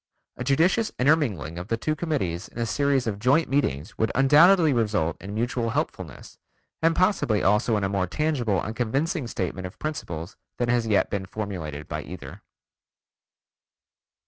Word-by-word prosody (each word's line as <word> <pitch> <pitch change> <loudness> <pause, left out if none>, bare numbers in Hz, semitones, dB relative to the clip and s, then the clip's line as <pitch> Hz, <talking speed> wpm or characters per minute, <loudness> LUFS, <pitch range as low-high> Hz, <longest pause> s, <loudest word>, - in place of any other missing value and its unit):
A - - -5
judicious 165 - +2
intermingling 125 - +1
of 90 - -7
the 115 - 0
two 155 +6 -1
committees 130 - -2
in - - -16
a 120 - 0
series 140 +2 +1
of 105 -3 -3
joint 135 +8 +3
meetings 85 - -1
would 110 - +1
undoubtedly 155 +4 +6
result 105 -9 0
in 100 +2 -7
mutual 120 +1 -1
helpfulness, 100 - -5 0.4
and 165 0 +3
possibly 180 - +2
also 105 +3 +3
in 105 - -2
a - - +2
more 95 -1 -1
tangible 125 - 0
and 110 +6 -4
convincing 135 +5 -1
statement 95 -3 -3
of 90 - -13
principles 85 - -5 0.2
than 120 -1 -1
has 120 -2 +1
yet 105 -2 +2
been 95 -2 -3
formulated 85 -9 -5
by - - -4
either. - - -9
115 Hz, 160 wpm, -25 LUFS, 95-145 Hz, 0.4 s, undoubtedly